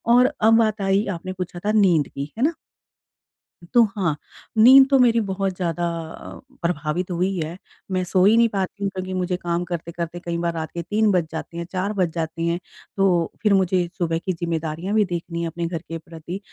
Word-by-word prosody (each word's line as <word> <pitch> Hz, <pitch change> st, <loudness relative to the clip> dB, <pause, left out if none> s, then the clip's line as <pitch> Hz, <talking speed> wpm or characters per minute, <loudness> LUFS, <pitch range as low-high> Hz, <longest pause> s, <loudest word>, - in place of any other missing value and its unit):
और 255 Hz, +3 st, +5 dB
अब 225 Hz, +1 st, +6 dB
बात 215 Hz, -2 st, +1 dB
आई, 195 Hz, +2 st, +2 dB
आपने 185 Hz, +1 st, -5 dB
पूछा 180 Hz, -1 st, -6 dB
था 210 Hz, -, +2 dB
नींद 175 Hz, -7 st, +4 dB
की, 140 Hz, +2 st, -6 dB
है 235 Hz, -, 0 dB
ना? 320 Hz, +3 st, +2 dB, 1.2 s
तो 240 Hz, -, +7 dB
हाँ, 175 Hz, -7 st, 0 dB, 0.4 s
नींद 265 Hz, +4 st, +9 dB
तो 275 Hz, -, +5 dB
मेरी 235 Hz, -2 st, +5 dB
बहुत 195 Hz, -2 st, -2 dB
ज़्यादा 175 Hz, -1 st, -2 dB, 0.3 s
अ, -, -, -10 dB, 0.2 s
प्रभावित 170 Hz, +1 st, -2 dB
हुई 180 Hz, +3 st, 0 dB
है, 165 Hz, +1 st, -4 dB, 0.3 s
मैं 185 Hz, -1 st, 0 dB
सो 180 Hz, +1 st, +2 dB
ही 210 Hz, +3 st, +6 dB
नहीं 235 Hz, 0 st, +6 dB
पाती 200 Hz, 0 st, -3 dB
हूँ 200 Hz, -, +1 dB
क्योंकि 185 Hz, 0 st, -4 dB
मुझे 180 Hz, -1 st, -1 dB
काम 175 Hz, -1 st, -2 dB
करते-करते 170 Hz, 0 st, -5 dB
कई 170 Hz, -1 st, -2 dB
बार 170 Hz, 0 st, -1 dB
रात 160 Hz, -1 st, -4 dB
के 170 Hz, -, -4 dB
3 210 Hz, +4 st, +1 dB
बज 175 Hz, -4 st, +1 dB
जाते 165 Hz, +1 st, -6 dB
हैं, 170 Hz, -, -3 dB
4 190 Hz, +3 st, -1 dB
बज 185 Hz, -4 st, +1 dB
जाते 165 Hz, 0 st, -3 dB
हैं। 170 Hz, +1 st, 0 dB, 0.4 s
तो 180 Hz, -4 st, +2 dB
फ़िर 210 Hz, -2 st, +3 dB
मुझे 185 Hz, -2 st, +2 dB
सुबह 165 Hz, -2 st, 0 dB
की 185 Hz, -, 0 dB
ज़िम्मेदारियाँ 165 Hz, +2 st, -3 dB
भी 215 Hz, -1 st, +4 dB
देखनी 170 Hz, -2 st, -4 dB
है 170 Hz, -, -1 dB
अपने 170 Hz, +1 st, -4 dB
घर 170 Hz, 0 st, -3 dB
के 165 Hz, -1 st, -6 dB
प्रति। 165 Hz, +3 st, -8 dB
180 Hz, 205 wpm, -23 LUFS, 170-195 Hz, 1.2 s, नींद